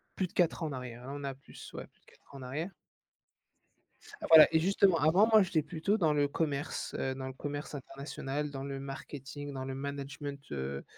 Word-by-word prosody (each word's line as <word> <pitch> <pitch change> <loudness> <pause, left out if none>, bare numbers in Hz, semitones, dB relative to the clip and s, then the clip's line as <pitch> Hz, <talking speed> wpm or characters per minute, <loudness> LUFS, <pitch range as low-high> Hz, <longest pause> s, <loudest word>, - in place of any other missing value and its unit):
plus 190 - 0
de - - -23
4 175 -1 +2
ans - - 0
en - - -4
arrière, 125 -2 -6
hein, 140 - -5
on 145 - -6
a 135 -1 -3
plus 135 - -12
ouais, - - -6
plus - - -35
de - - -35
4 - - -22
ans - - -8
en - - -9
arrière. 150 +9 -4 1.6
Voilà, 160 -1 +11
et 160 - +4
justement, 190 -1 +4
avant, 165 +8 +5
moi 215 -2 +8
j'étais 170 -4 +1
plutôt 165 +7 0
le 150 -4 +3
commerce, 145 -2 -2
heu, 130 - -1
dans 130 0 -5
le 130 - -5
commerce 145 +2 -5
international, 140 +1 -4
dans 135 -1 -5
le 140 -1 -4
marketing, 140 +1 -7
dans 130 -1 -4
le 135 - -4
management, 140 0 -5
heu 70 0 -3
145 Hz, 210 wpm, -32 LUFS, 135-160 Hz, 1.6 s, Voilà